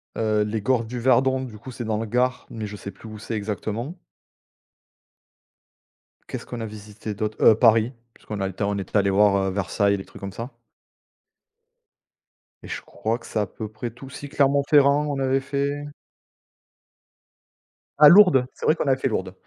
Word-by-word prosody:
heu, 110 -1 +1
les 105 +1 -3
Gores 120 +1 +1
du 120 +2 -5
Verdon, 130 +1 +3
du 115 -5 -8
coup, 125 +4 -10
c'est 120 - -6
dans 110 -1 -1
le 110 - -3
Gard, 125 +3 0
mais 110 -2 -6
je 105 - -8
sais 100 - -7
plus 100 +4 -14
où 110 - -9
c'est 110 +1 -5
exactement 110 - -4 2.3
qu'est-ce - - -6
qu'on 120 - -7
a - - -3
visité 105 0 -8
d'autre? 110 +1 -3
Heu, 110 - +8
Paris, 115 0 +4 0.2
puisqu'on 105 -2 -7
a 95 - 0
été 95 - -10
en, 100 0 0
on - - -2
était 95 +2 -2
allé 100 -1 +3
voir, 100 0 +4
heu, - - -3
Versailles, 100 +1 +1
les 95 - -8
trucs - - -14
comme 100 -1 -6
ça 115 +6 -6 2.1
et - - -9
je - - -5
crois 115 +2 -3
que - - -16
c'est 110 - -2
à 105 - +1
peu 110 +3 -7
près 110 +2 -6
tout. 125 +4 -12
Si 145 +2 -9
Clermont-Ferrand, 140 +1 +3
on 140 -1 -2
avait 135 0 +2
fait 140 +1 -2 2.1
ah 150 - +10
Lourdes, 180 -9 +7
c'est - - -7
vrai 155 - +4
qu'on 155 - -2
a 135 - +4
fait 130 - -1
Lourdes. - - -3
115 Hz, 190 wpm, -24 LUFS, 105-135 Hz, 2.3 s, ah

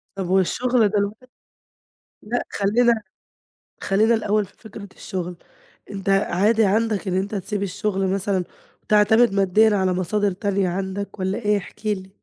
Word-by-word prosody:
طب 190 -2 -4
والشغل 220 +4 +2
دلوقتي 210 +4 -2 0.9
لا 240 +3 -2
خلّينا 225 +3 +2 0.8
خلّينا 215 +4 +3
الأوّل 215 -1 +1
في - - -23
فكرة 215 -2 -10
الشغل، 180 -2 -5 0.5
أنت 195 -1 -6
عادي 200 +3 +3
عندك 210 0 0
إن 180 - -1
أنت 200 +3 -2
تسيب 200 +1 -3
الشغل 195 0 -1
مثلًا، 195 -1 0 0.4
وتعتمد 215 +2 +4
ماديًا 205 +2 +3
على 190 -1 +1
مصادر 195 +2 0
تانية 195 -1 -1
عندك 195 +3 -4
والّا 190 +1 -1
إيه؟ 210 -2 +1
احكِ 210 +3 -12
لي. 190 -2 -2
200 Hz, 135 wpm, -22 LUFS, 190-215 Hz, 0.9 s, وتعتمد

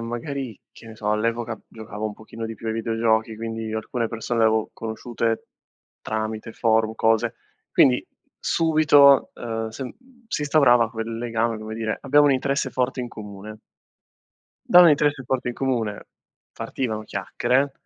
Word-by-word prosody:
magari, 120 0 -5
che 115 - -15
ne 110 - -10
so, 105 -1 -3
all'epoca 115 +1 -1
giocavo 110 -1 -8
un 110 - -4
pochino 110 +2 -9
di 115 0 -5
più 115 - -10
ai 110 - -1
videogiochi, 115 -1 0
quindi, 115 -1 -5
alcune 115 +2 -2
persone 115 +1 -2
le - - +5
avevo 110 0 +1
conosciute 115 0 -3 0.6
tramite 110 +1 -4
forum, 110 -1 +2
cose. 115 +1 +1 0.4
Quindi, 125 -2 +4 0.3
subito, 150 -4 +5
uhm, 115 -1 -4
sen 125 +3 -7 0.3
si 150 - -2
instaurava 125 -6 +4
quel 115 0 -4
legame, 115 -1 -1
come 110 0 -7
dire: 110 -1 -2
"Abbiamo 145 +2 +5
un 140 - +5
interesse 135 0 0
forte 130 0 -1
in 120 - -4
comune." 105 -1 -9 1.1
Da 180 - +8
un 175 - +9
interesse 145 -2 +2
forte 125 0 -1
in 120 - -3
comune, 120 -6 -2 0.5
partivano 110 -5 -3
chiacchiere, 125 +7 0
115 Hz, 150 wpm, -23 LUFS, 110-130 Hz, 1.1 s, un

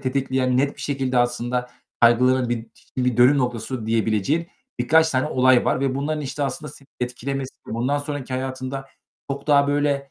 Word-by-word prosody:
tetikleyen, 130 -1 0
net 140 +2 +1
bir - - -11
şekilde 135 -3 -1
aslında 120 +1 0 0.3
kaygılarını 125 +1 +4
bir 115 -1 -2
ş - - -24 0.2
bir 125 -2 +1
dönüm 130 +4 +6
noktası 120 -2 -2
diyebileceğin 115 - +1 0.3
birkaç 160 0 +4
tane 130 +2 +1
olay 130 -3 +4
var 130 - +1
ve 135 -1 0
bunların, 150 +2 -2
işte, 145 +1 -4
aslında, 140 +2 -4
seni 140 0 -16
etkilemesi, 130 +2 -4
bundan 125 +6 -1
sonraki 145 -3 -5
hayatında 130 +1 -4 0.4
çok 140 +1 -4
daha, 140 -1 +5
böyle, 145 -1 0
130 Hz, 165 wpm, -23 LUFS, 125-140 Hz, 0.4 s, dönüm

